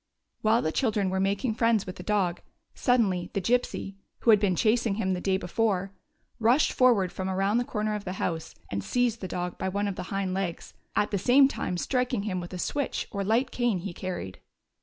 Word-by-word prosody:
While 220 +2 +3
the 155 - 0
children 210 -5 0
were 190 - 0
making 200 +5 0
friends 230 -2 +2
with 185 - -7
the - - -7
dog, 195 -5 0 0.3
suddenly 195 -9 +1
the - - 0
Gypsy, 200 -2 -1 0.2
who 230 - +5
had 210 - +6
been 195 -3 +2
chasing 225 +1 +2
him 190 -3 0
the 180 - -3
day 190 0 +1
before, 195 0 -1 0.5
rushed 240 +6 +4
forward 225 -8 +4
from 190 0 -4
around 195 +4 +1
the - - +1
corner 215 -2 -2
of 210 -1 -3
the 185 - -4
house 165 -3 -3 0.2
and 100 -1 -2
seized 245 - 0
the 190 - -3
dog 180 0 -4
by 190 - -1
one 200 +2 -1
of 195 - -4
the 180 - -6
hind 195 -2 -1
legs, 185 -3 -3 0.2
at 210 - +1
the 200 - 0
same 265 +7 +6
time 180 -9 -3
striking 250 0 0
him 190 -3 -2
with 175 -1 -7
a 185 - -5
switch 285 +9 -2
or 200 -2 -2
light 230 +6 +1
cane 240 -5 +1
he 180 +1 -5
carried. 175 - -5
200 Hz, 215 wpm, -27 LUFS, 185-230 Hz, 0.5 s, had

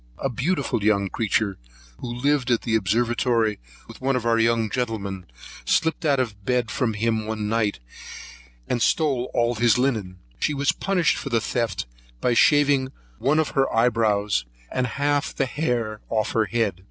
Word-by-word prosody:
A 135 - -2
beautiful 135 - -1
young 100 -2 +2
creature, 105 -2 -1 0.4
who 120 - -5
lived 135 +2 0
at 120 -2 +2
the 115 - -2
Observatory 115 +1 +1 0.3
with - - -13
one 135 +1 +1
of 125 -2 -2
our 115 -1 +3
young 115 -1 +2
gentlemen, 100 -6 -3 0.4
slipped 160 0 +1
out 140 -3 +3
of 105 -6 -3
bed 125 -1 0
from 115 -4 -1
him 110 +1 +1
in 110 - -6
the 110 - -2
night, 105 0 0 0.9
and 120 - -1
stole 135 -5 +1
all 120 0 +1
his 120 +1 +3
linen. 110 -8 -1 0.2
She 150 - 0
was 140 +1 +2
punished 185 -4 +1
for 140 - -5
the 115 -3 +2
theft, 115 -1 -2 0.3
by 120 - +1
shaving 140 +1 +4 0.3
one 140 +4 +2
of 160 -2 +2
her 135 -1 +1
eye 115 +2 +4
brows, 105 - +1 0.3
and 125 0 0
half 145 +2 0
of - - -13
the 135 - +1
hair 120 -6 -2
off 110 -2 0
her 110 -1 +2
head. 105 -5 -1
120 Hz, 175 wpm, -24 LUFS, 110-135 Hz, 0.9 s, shaving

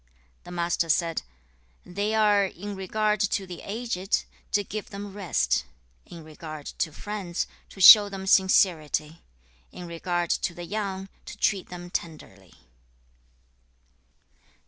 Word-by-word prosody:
The - - -10
Master 170 -1 -1
said, 165 +1 +1 0.6
'They 205 +4 -2
are, 210 -2 +4
in 200 +3 -7
regard 210 +2 0
to 200 -1 0
the 180 -2 -9
aged, 205 -3 -2 0.3
to 205 - +2
give 210 +1 -6
them 200 0 -7
rest; 65 - 0 0.4
in 170 -2 -11
regard 155 -1 -9
to 160 - -3
friends, 195 -1 -4 0.2
to - - -14
show 205 +2 +10
them 195 -1 -6
sincerity; 165 -5 +2 0.5
in 180 - -9
regard 175 0 -2
to 175 - -1
the 175 - -7
young, 195 -1 -4 0.2
to - - -9
treat 195 -3 0
them 175 0 -9
tenderly.' 100 - -7
185 Hz, 125 wpm, -26 LUFS, 170-205 Hz, 0.6 s, show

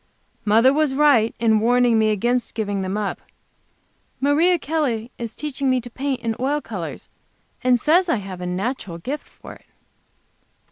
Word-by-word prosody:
Mother 225 +5 +5
was 295 -2 +1
right 275 -6 +4
in 220 -2 +3
warning 240 0 +3
me 220 0 +3
against 240 +4 0
giving 205 -3 -2
them 190 +2 -2
up. 210 -2 -3 1.0
Maria 315 +6 +3
Kelley 275 -8 -2
is 230 -2 -6
teaching 280 -2 -2
me 255 -1 +2
to 245 0 -10
paint 270 0 -3
in 225 -2 -2
oil 280 +4 0
colors, - - -7 0.6
and 250 -1 +4
says 345 +6 +3
I - - +3
have 190 -4 -6
a 180 - -4
natural 190 -1 -3
gift 270 - -5
for - - -12
it. - - -19
245 Hz, 160 wpm, -22 LUFS, 215-280 Hz, 1.0 s, Mother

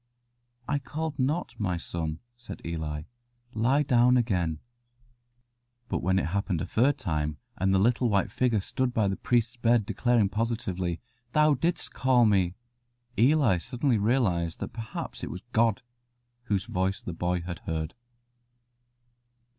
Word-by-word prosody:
"I 145 - +1
called 150 +3 -4
not, 150 +7 0
my 90 -5 0
son," 80 -2 -4
said 120 0 -9
Eli. 80 -2 -3 0.5
"Lie 130 +7 +2
down 125 -1 +4
again." 90 -9 0 1.3
But - - -1
when 95 +2 +2
it - - +1
happened 95 0 -1
a - - -2
third 130 +5 +2
time, 75 -2 -2 0.2
and 95 +1 +1
the 95 - +4
little 120 +4 +3
white 100 -2 +1
figure 120 -5 +1
stood 125 +5 -2
by 110 -3 +3
the 95 - 0
priest's 120 +2 0
bed, 120 -2 +3
declaring 120 -1 +2
positively, 95 -5 -2 0.3
"Thou 150 0 +5
didst 165 +6 -1
call 125 -2 +4
me," 95 -4 +2 0.6
Eli 125 - +4
suddenly 125 - 0
realized 100 -8 +1
that - - -5
perhaps 115 -1 -6
it - - -3
was 90 - -7
God 115 -1 +2 0.6
whose 100 -4 0
voice 95 +1 -1
the 90 - -6
boy 90 +1 -1
had 85 0 -6
heard. 80 0 -2
110 Hz, 145 wpm, -28 LUFS, 90-125 Hz, 1.3 s, Thou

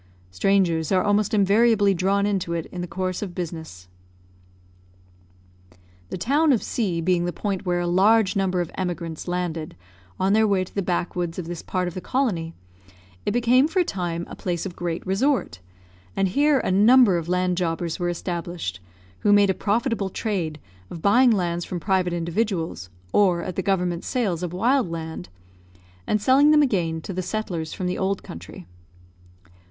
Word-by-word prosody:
Strangers 165 - +1
are 185 -1 +3
almost 205 0 +1
invariably 205 0 +4
drawn 195 +2 +1
into 190 -4 -1
it 165 -2 -2
in 180 - -5
the 175 - -4
course 185 0 -3
of 190 -4 -5
business. 160 - -6 2.2
The - - -4
town 285 - +2
of 240 - +2
C 185 -8 -1
being 175 0 +1
the 175 - -1
point 195 0 -4
where 175 0 +1
a - - -1
large 200 +4 +3
number 190 -2 +1
of 175 - -5
emigrants 175 -3 -4
landed 175 - -3 0.4
on 190 +1 +2
their 220 0 +4
way 195 -2 +2
to 185 - -12
the 200 - -1
backwoods 175 -2 -2
of 180 - -4
this 170 0 -6
part 185 -1 -2
of 175 - -5
the 185 - -6
colony, 180 -12 -1 0.7
it - - +2
became 245 +4 +4
for 325 - -6
a 365 - +5
time 175 - -3
a - - -9
place 175 -1 -3
of 180 -3 -6
great 170 -1 -4
resort, 195 - 0 0.6
and 195 -1 +1
here 290 +7 +3
a - - -1
number 210 -1 +5
of 165 +1 -7
land 180 0 +1
jobbers 170 -1 -2
were 175 0 0
established, 170 - -4 0.4
who 205 - +2
made 205 -1 +5
a - - 0
profitable 220 0 -1
trade 180 -7 -3 0.3
of 165 - -9
buying 245 +6 +5
lands 175 -5 0
from 175 - -5
private 185 -1 +1
individuals, 170 - -2 0.2
or 180 -4 +3
at 180 - -5
the - - 0
government 180 -3 -1
sales 200 -10 -1
of 180 -2 -3
wild 235 +4 +1
land, 160 - -6 0.8
and 210 - +1
selling 270 +7 +5
them 300 -1 +6
again 170 - 0
to 190 - -6
the 185 - -2
settlers 180 -5 -4
from 185 - -4
the 180 - -2
old 195 0 -1
country. 85 +1 -10
185 Hz, 175 wpm, -24 LUFS, 170-205 Hz, 2.2 s, them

